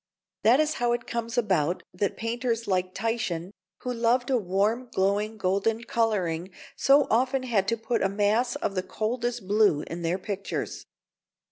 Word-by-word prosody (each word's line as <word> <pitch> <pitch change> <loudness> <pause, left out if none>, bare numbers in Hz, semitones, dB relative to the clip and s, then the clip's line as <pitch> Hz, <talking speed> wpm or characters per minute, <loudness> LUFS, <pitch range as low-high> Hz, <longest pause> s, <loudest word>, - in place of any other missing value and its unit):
That 240 +5 +5
is 310 0 +2
how 240 0 +3
it 240 - -3
comes 235 +1 -4
about 185 -7 +1
that 195 +2 -1
painters 230 0 -2
like 185 -1 0
Titian, 195 -5 -2 0.3
who 250 - -2
loved 240 +2 +1
a 255 - +4
warm, 210 +6 0
glowing, 205 +3 0
golden 200 +4 0
colouring, 190 -8 0 0.3
so 280 +1 +5
often 255 +3 +2
had 215 -6 +1
to 230 +2 +1
put 225 +2 -1
a 195 - +2
mass 210 +5 +1
of - - -2
the 185 - 0
coldest 235 +3 -3
blue 205 -7 +3
in 170 +1 -6
their 170 +2 0
pictures. 195 0 -4
220 Hz, 160 wpm, -27 LUFS, 190-240 Hz, 0.3 s, That